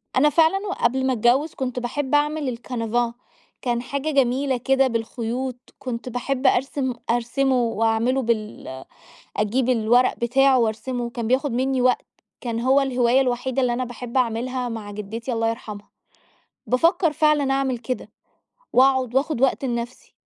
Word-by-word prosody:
أنا 295 +4 +5
فعلًا 325 +4 +4
وقبل 265 -8 0
ما 260 - +2
أتجوز 250 +7 +2
كنت 255 -2 -3
باحب 265 +3 -1
أعمل 295 -4 0
الcanvas 235 -1 -2 0.5
كان 240 -1 -1
حاجة 280 +4 -3
جميلة 265 -1 +1
كده 270 +2 +2
بالخيوط، 235 +2 -3 0.2
كنت 250 -1 -5
باحب 260 +2 -1
أرسم 265 0 +1 0.2
أرسمه 245 +3 +1
وأعمِلُه 225 +3 +1
بال 215 - -3 0.5
أجيب 235 +5 0
الورق 245 +1 +3
بتاعه 265 +2 +3
وأرسمه 240 +2 -1
كان 235 -1 -4
بياخد 260 +2 +1
مِنّي 260 +1 0
وقت، 250 0 +2 0.3
كان 230 -2 -3
هو 260 +3 +4
الهواية 255 -1 +2
الوحيدة 255 +1 0
اللي 245 -1 +2
أنا 250 +2 -1
باحب 245 0 -7
أعملها 250 +1 0
مع 220 -3 -6
جدتي 215 +4 -5
الله 225 -1 0
يرحمها. 215 -3 -8 0.8
بافكر 330 +6 +3
فعلًا 295 -2 +2
أعمل 270 -2 0
كده، 250 +2 -5 0.6
وأقعد 260 -1 +3
وأخُد 275 -1 +1
وقت 270 +1 +2
لنفسي. 235 0 -5
250 Hz, 140 wpm, -23 LUFS, 235-270 Hz, 0.8 s, أنا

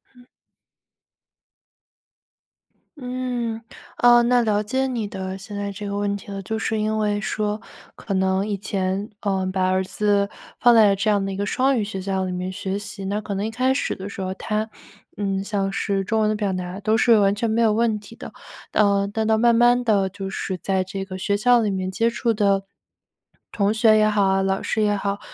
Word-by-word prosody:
嗯。 245 - -18 2.7
嗯， 250 -3 -3 0.4
呃， 240 0 +6
那 245 +1 +3
了 210 -3 +1
解 260 +5 -1
你 235 -5 -2
的 190 -1 -5
现 200 +1 -8
在 200 0 -3
这 205 +1 -7
个 200 - -3
问 205 0 0
题 200 0 -9
了。 195 -1 -5
就 220 +3 -3
是 220 -1 -1
因 215 0 0
为 210 -1 0
说 210 0 -2 0.4
可 200 - -5
能 190 +1 +1
以 210 - -1
前， 195 0 -2
嗯， 190 -2 -1
把 185 -1 +1
儿 185 0 +1
子 200 +1 +1 0.3
放 240 -1 +6
在 210 -3 +6
这 200 +2 0
样 200 -2 +2
的 195 - -3
一 - - -4
个 200 - -2
双 260 +5 +1
语 - - 0
学 205 -2 -5
校 190 0 -2
里 185 - -3
面 180 +1 -3
学 190 +1 -3
习， 200 0 -7
那 200 +2 -1
可 210 -1 -5
能 195 +1 -2
一 - - -3
开 255 +4 +1
始 280 - -1
的 195 +1 -7
时 195 - -7
候， 185 0 -3
他， 215 +1 -2 0.5
嗯， 195 -1 -1
像 200 -1 -1
是 195 -1 -1
中 220 +3 0
文 215 - +2
的 215 - 0
表 205 -3 -1
达 180 +1 -5
都 220 +1 +2
是 230 -1 +5
完 195 0 +3
全 220 +3 -1
没 230 +1 +2
有 215 -2 +3
问 225 -1 +1
题 210 +2 -14
的， - - -9 0.4
呃， 200 -1 +3
但 220 +1 -1
到 220 0 +2
慢 235 0 +4
慢 240 +1 +4
地 205 -5 +2
就 195 0 -6
是 190 0 -3
在 190 0 0
这 195 +1 -5
个 185 -1 -7
学 200 +2 0
校 240 +3 +4
里 210 -2 0
面 185 -1 -2
接 225 +5 +1
触 235 0 0
的 200 -3 +2 0.9
同 200 -1 +1
学 220 0 +4
也 215 0 +4
好， 195 -2 +2
老 190 0 -1
师 220 - -1
也 205 -1 +2
好， 200 0 -2
205 Hz, 225 characters per minute, -22 LUFS, 195-220 Hz, 2.7 s, 呃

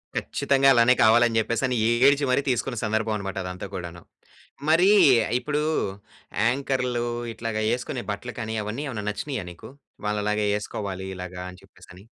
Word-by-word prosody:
ఖచ్చితంగా 135 0 +2
అలానే 120 0 +5
కావాలి 120 +1 +6
అని 115 -1 -2
చెప్పేసి, 115 +2 -1
అని 125 - -1 0.3
ఏడ్చి 145 +1 +3
మరి 130 - +3
తీసుకున్న 125 0 -1
సందర్భం 110 0 0
అనమాట 95 -1 -5
అదంతా 90 +2 -6
కూడాను. 85 -1 -7 0.7
మరి 170 +5 +5 0.5
ఇప్పుడు 150 +2 -2 0.9
యాంకర్‌లు 125 -1 -1 0.3
ఇట్లాగా 110 -1 -3
ఏసుకునే 125 0 -4
బట్టలు 110 +5 -6
కానీ 110 -1 -4
అవన్నీ 110 +7 -4
ఏమైనా 105 -5 -5
నచ్చినాయా 125 -1 -4
నీకు? 85 - -12 0.4
వాళ్ళలాగ 105 0 0 0.2
ఏసుకోవాలి 95 -2 -5
ఇలాగా 90 0 -7
అని 90 - -15
చెప్పేసి - - -19
అని. 95 +3 -15
110 Hz, 150 wpm, -25 LUFS, 100-125 Hz, 0.9 s, కావాలి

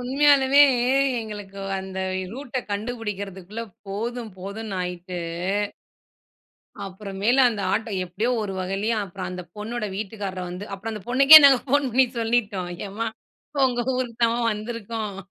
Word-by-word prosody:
உண்மயாலுமே 275 +1 +4 0.6
எங்களுக்கு 205 -3 -8 0.2
அந்த 190 0 -6 0.3
ரூட்ட 260 0 -4
கண்டுபிடிக்கிறதுக்குள்ள, 205 -1 -5 0.2
போதும் 230 +2 -4
போதும்ன்னாயிட்டு. 185 -3 -5 1.6
அப்புறம் 195 0 -8
மேலு 245 +6 +4
அந்த 220 -4 -3
ஆட்டோ, 225 0 -1
எப்டியோ 190 +7 -2
ஒரு 200 -2 -4
வகையிலயே 195 +5 -1
அப்புறம் 185 -1 -6
அந்த 180 0 -6
பொண்ணோட 220 +2 -4
வீட்டுக்காரர் 195 -3 -5
வந்து 180 +3 -6
அப்புறம் 215 +3 -6
அந்த 210 -2 -7
பொண்ணுக்கே 275 +5 +10
நாங்க 275 -2 +8
போன் 285 +2 +3
பண்ணி 260 +2 +4
சொல்லிட்டோம். 210 -6 0 0.2
எம்மா 220 +4 -3 0.6
உங்க 245 -1 -1
ஊருக்கு 250 -2 -3
தான் 235 +1 +1
வந்துருக்கோம். 215 -1 -5
215 Hz, 120 wpm, -24 LUFS, 195-240 Hz, 1.6 s, பொண்ணுக்கே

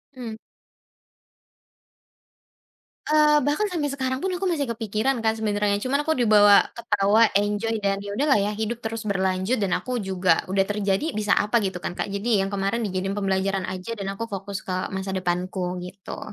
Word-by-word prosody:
Mhm. 230 -4 -6 2.7
Eee, 300 0 +5
bahkan 300 +9 +1
sampai 310 -5 -1
sekarang 260 -1 -2
pun 380 - -2
aku 360 - -5
masih 290 -6 -1
kepikiran, 225 +3 -1
Kak, 220 0 +1
sebenernya. 205 -1 0
Cuman 275 +6 0
aku 315 - 0
dibawa 210 -6 +6 0.2
ketawa, 215 -1 +3 0.2
enjoy, 210 +2 -1
dan 200 -1 -1
ya 205 - -6
udahlah 270 +6 +2
ya 205 0 +1
hidup 220 +3 -4
terus 220 0 -4
berlanjut, 190 +3 0
dan 190 - -1
aku 255 - -4
juga 185 -3 +1
udah 195 0 +2
terjadi, 205 +8 -1
bisa 210 0 -1
apa 215 +2 +2
gitu 190 -2 -2
kan, 175 +1 -5
Kak. 195 - -3
Jadi 200 0 +1
yang 195 - -4
kemaren 200 +4 -1
dijadiin 195 -1 -2
pembelajaran 195 -1 0
aja 185 +5 -5
dan 195 -2 -4
aku 230 +3 -5
fokus 195 -2 -5
ke 185 0 -4
masa 190 0 -3
depanku 180 0 -2
gitu. 180 +2 -8
205 Hz, 170 wpm, -24 LUFS, 195-235 Hz, 2.7 s, dibawa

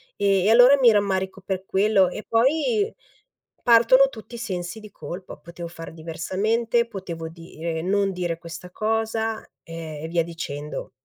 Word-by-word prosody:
e 195 -2 +2
e - - +4
allora 245 +4 +8
mi 245 -3 +7
rammarico 195 -2 0
per 190 0 -4
quello 195 -1 +3
e 210 - -7
poi 320 - +2 0.7
partono 240 +3 +6
tutti 225 -1 -11
i - - -6
sensi 185 -3 -4
di 215 -1 -12
colpa: 185 0 -8
potevo 170 +3 -9
fare 165 -1 -9
diversamente, 215 +9 0
potevo 175 -7 -6
dire 165 0 -6
non 195 +2 +1
dire 175 -2 -2
questa 170 +2 -9
cosa 220 +1 -1 0.2
e 160 -1 -7
via 170 0 +1
dicendo. 150 -3 -6
190 Hz, 145 wpm, -24 LUFS, 170-225 Hz, 0.7 s, allora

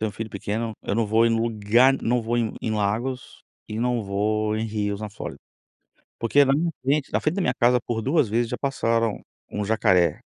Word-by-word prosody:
tenho 110 - 0
um - - -15
filho 110 -1 -6
pequeno, 110 +3 -3
eu - - -2
não 115 -1 +1
vou 110 +2 +3
em 115 - +2
lugar 115 +3 +3
não 120 +1 +1
vou 115 +2 -1
em 115 -2 0
em 110 - -2
lagos 110 +5 -2 0.3
e 110 +1 -4
não 120 -1 0
vou 105 +2 0
em 110 - -1
rios 105 -2 -2
na 105 -1 -5
Flórida. 105 - -7 0.8
Porque 140 +5 +4
na 135 - +2
minha 165 +4 +1
frente 140 +2 0
na - - +1
frente 155 +3 0
da 195 - 0
minha - - +1
casa 125 0 +3
por 115 -2 -3
2 135 -3 +2
vezes 115 +2 0
já - - -2
passaram 115 -5 0 0.3
um 105 - -3
jacaré. 100 -5 +2
115 Hz, 215 wpm, -24 LUFS, 105-125 Hz, 0.8 s, Porque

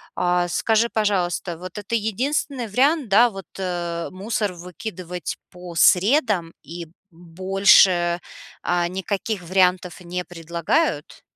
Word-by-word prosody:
А, 175 0 +1
скажи, 225 +5 +1
пожалуйста, 180 -5 -1
вот 185 +2 -9
это 210 +2 -7
единственный 245 +4 -1
вариант, 270 +4 +2
да, 230 +5 +6
вот, 195 -3 -9
э, 175 -2 -3
мусор 205 +1 -2
выкидывать 180 0 -6 0.2
по 180 -1 -10
средам 195 - +3
и 170 0 -8 0.3
больше, 175 0 +3 0.4
а, 175 -1 +1
никаких 190 +2 -3
вариантов 180 0 +1
не 180 0 -5
предлагают? 170 - -2
185 Hz, 110 wpm, -22 LUFS, 175-210 Hz, 0.4 s, да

